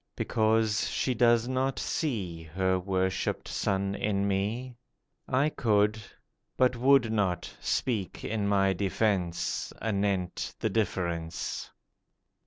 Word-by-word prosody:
Because 110 -1 +1
she 130 - 0
does 120 0 +4
not 130 +1 0
see 100 - -2
Her 95 +3 0
worshipped 95 0 -1
son 95 0 -1
in 100 -1 0
me. 110 +6 -1 0.5
I 135 +4 +2
could, 105 -5 +2 0.6
but 125 -1 +3
would 130 -1 +4
not, 95 -5 -1
speak 105 -9 -2
in 105 -2 -1
my 95 -1 +3
defence, 95 -2 -1
Anent 100 -4 -1
the 110 - -1
difference. 85 -6 -2
105 Hz, 105 wpm, -29 LUFS, 95-115 Hz, 0.6 s, does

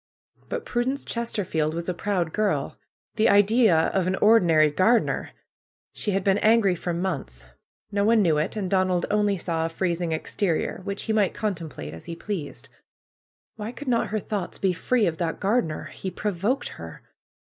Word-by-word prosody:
But - - -4
Prudence 255 +3 -1
Chesterfield 180 -9 -2
was 170 0 -4
a 180 - 0
proud 175 -3 -1
girl. 215 -1 0 0.4
The 220 - +4
idea 205 -4 +4
of 190 -2 +1
an 185 - +1
ordinary 170 -9 +5
gardener! 220 +9 +2 0.6
She - - -3
had 195 -1 0
been 195 +1 +3
angry 215 -3 +4
for 175 0 -3
months. 170 - -4 0.5
No 200 0 +1
one 220 0 +4
knew 160 -4 +3
it. 155 - -2
And 205 -3 -2
Donald 185 -2 +1
only 205 -1 +2
saw 165 -2 -2
a 165 - -1
freezing 170 0 -1
exterior, 165 +3 -1
which 200 0 -3
he 220 - -1
might 210 -3 +2
contemplate 165 - -4
as 80 - -10
he 170 - -6
pleased. 175 -6 -6 0.9
Wliy 215 +3 -5
could 290 - -9
not 235 -2 +2
her 215 - -2
thoughts 205 -3 -4
be 190 -2 +1
free 230 +5 +1
of 160 -3 -1
that 165 -2 -2
gardener? 195 -6 -1
He 190 - -5
provoked 210 +7 -1
her. - - -10
190 Hz, 170 wpm, -25 LUFS, 170-215 Hz, 0.9 s, ordinary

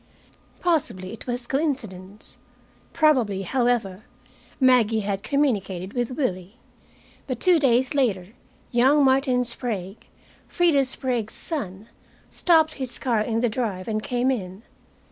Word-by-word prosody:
Possibly 260 - 0
it 230 - -10
was 245 0 -2
coincidence. 220 - -4 0.5
Probably, 245 -11 +2
however, 235 -3 0 0.6
Maggie 240 -4 +4
had 200 -1 -2
communicated 200 -10 -1
with 245 -2 -1
Willie. 200 - -3 0.7
But 255 -3 -3
two 360 -3 +4
days 260 0 +2
later 205 -10 0 0.4
young 265 +5 +4
Martin 260 -1 +3
Sprague, 220 -5 -5 0.4
Freda 315 -7 +3
Sprague's 245 -4 -3
son, 210 - -5 0.4
stopped 320 -3 +3
his 255 -2 -3
car 235 -5 0
in 225 +1 -1
the 245 - +3
drive 210 -6 -3
and 215 -1 -1
came 250 +3 0
in. 195 -4 -5
240 Hz, 120 wpm, -24 LUFS, 200-265 Hz, 0.7 s, Maggie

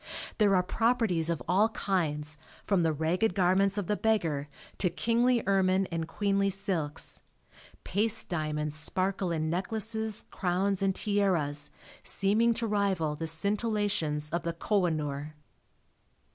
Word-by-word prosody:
There 205 -2 +4
are 180 - +3
"properties" 220 -6 +1
of 170 - -2
all 195 +6 +3
kinds 155 -8 -1 0.3
from 195 -3 +2
the 165 -1 +2
ragged 170 +7 0
garments 195 +1 +3
of 205 - -1
the 210 - 0
beggar 165 -11 0 0.3
to 180 - +2
kingly 235 +6 +2
ermine 190 -1 +2
and 165 -1 -2
queenly 200 +2 +1
silks. 185 -7 -1 0.6
Paste 220 +3 +1
diamonds 150 -3 -2
sparkle 185 +4 -1
in 160 -1 -1
necklaces, 220 +4 -2
crowns 190 +1 0
and 195 -1 +1
tiaras, 175 -9 +1 0.3
seeming 215 +4 +2
to 230 - -1
rival 195 -8 0
the 160 +2 -4
scintillations 200 -4 0
of 170 - 0
the 170 0 -3
Kohinoor. 155 -6 -1
185 Hz, 130 wpm, -29 LUFS, 160-205 Hz, 0.6 s, There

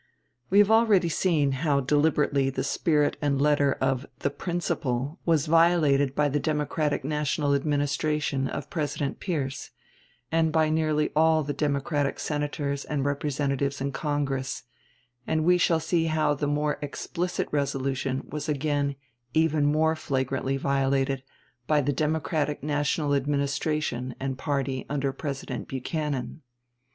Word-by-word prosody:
We 195 - +3
have 205 +1 +6
already 215 -6 +4
seen 155 -5 +2
how 140 +1 +1
deliberately 145 0 +2
the 130 0 -2
spirit 150 +2 +1
and 140 -2 +1
letter 145 -1 +3
of 130 -1 0
"the 140 - -1
principle" 150 -4 -2
was 160 -3 +3
violated 155 -4 +3
by 150 - +3
the 145 +1 0
Democratic 150 -1 -1
National 150 0 0
Administration 145 -1 0
of 140 +1 -6
President 145 -3 -2
Pierce, 140 -8 -3 0.6
and 160 -1 +2
by 155 -1 +2
nearly 155 -1 +1
all 160 0 +4
the 145 +1 -3
Democratic 140 0 -1
Senators 145 -1 -2
and 140 -2 -2
Representatives 140 -1 -1
in 140 +1 -2
Congress; 135 -2 -2 0.6
and 155 0 +1
we 180 +1 +5
shall 165 -1 +3
see 165 +1 0
how 155 -2 +2
the 145 0 -2
more 150 +1 0
explicit 170 +5 -3
resolution 135 -2 -1
was 150 +1 -5
again 145 -1 0 0.4
even 155 -2 +3
more 160 +2 +2
flagrantly 135 -2 -1
violated 135 0 +1 0.5
by 150 -1 +3
the 145 0 0
Democratic 150 -1 -1
National 145 0 0
Administration 140 -2 -1
and 135 -1 -3
party 135 -3 -1
under 140 -1 -1
President 135 -3 -5
Buchanan. 140 +2 -3
145 Hz, 130 wpm, -26 LUFS, 140-155 Hz, 0.6 s, have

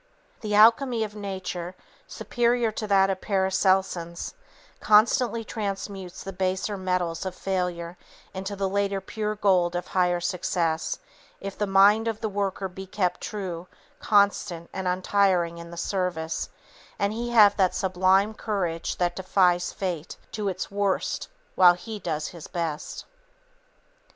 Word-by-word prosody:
The 210 -2 -2
alchemy 230 +2 +5
of 210 -1 -5
Nature, 190 -3 -5 0.3
superior 240 -1 0
to 215 0 -4
that 195 -1 +4
of 190 - -3
the - - -20
Paracelsians, 190 -3 +1 0.5
constantly 230 +2 +4
transmutes 195 -4 -5
the 195 - -6
baser 190 +2 -1
metals 180 -3 -1
of 190 -1 -4
failure 180 -3 -3 0.4
into 190 +2 -4
the 195 0 -1
later 200 0 0
pure 210 +2 -3
gold 185 -4 +2
of 175 - -2
higher 180 -1 +2
success, 175 -2 -1 0.4
if 195 -1 -6
the 210 - -1
mind 200 +3 +5
of 225 -1 -2
the 220 - -2
worker 195 -1 -2
be 190 +1 -9
kept 180 -2 -1
true, 185 -4 -5 0.3
constant 200 -4 +1
and 190 -1 -3
untiring 180 -2 +1
in 170 0 -9
the 170 - -10
service, 175 -4 -2 0.5
and 200 +1 0
he 240 +2 -3
have 210 -4 +6
that 185 -3 +2
sublime 190 +2 +2
courage 185 -7 -2
that 175 -1 0
defies 180 -2 +2
fate 175 -5 -4
to 210 -2 -3
its 185 +1 -4
worst 200 -1 -1 0.3
while 180 -1 +7
he 215 +4 -7
does 155 -5 -3
his 170 -3 -10
best. 165 -3 -4
190 Hz, 140 wpm, -26 LUFS, 180-205 Hz, 0.5 s, while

